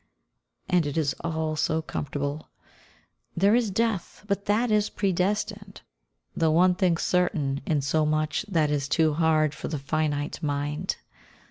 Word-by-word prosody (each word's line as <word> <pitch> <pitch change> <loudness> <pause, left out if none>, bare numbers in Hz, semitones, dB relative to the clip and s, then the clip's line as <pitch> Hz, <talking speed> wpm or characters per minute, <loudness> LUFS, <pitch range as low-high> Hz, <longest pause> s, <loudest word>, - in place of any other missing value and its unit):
And 175 -4 +2
it 145 - -4
is 145 -4 +1
all 160 -2 -2
so 160 +1 0
comfortable. 145 0 -4 0.9
There 200 +4 +4
is 235 -2 +3
Death, 210 -1 -2
but 200 -1 -1
that 220 +3 +1
is 210 0 +2
predestined, 200 +1 -1 0.5
the 165 -1 +2
one 180 +3 +4
thing 180 -2 +2
certain 155 -7 0
in 150 -3 +1
so 150 +3 +1
much 155 +2 0
that 160 -6 +1
is 145 -1 0
too 160 -1 +3
hard 155 -1 +2
for - - -6
the 155 - -3
finite 145 +1 -2
mind. 145 +3 -2
160 Hz, 145 wpm, -26 LUFS, 150-190 Hz, 0.9 s, There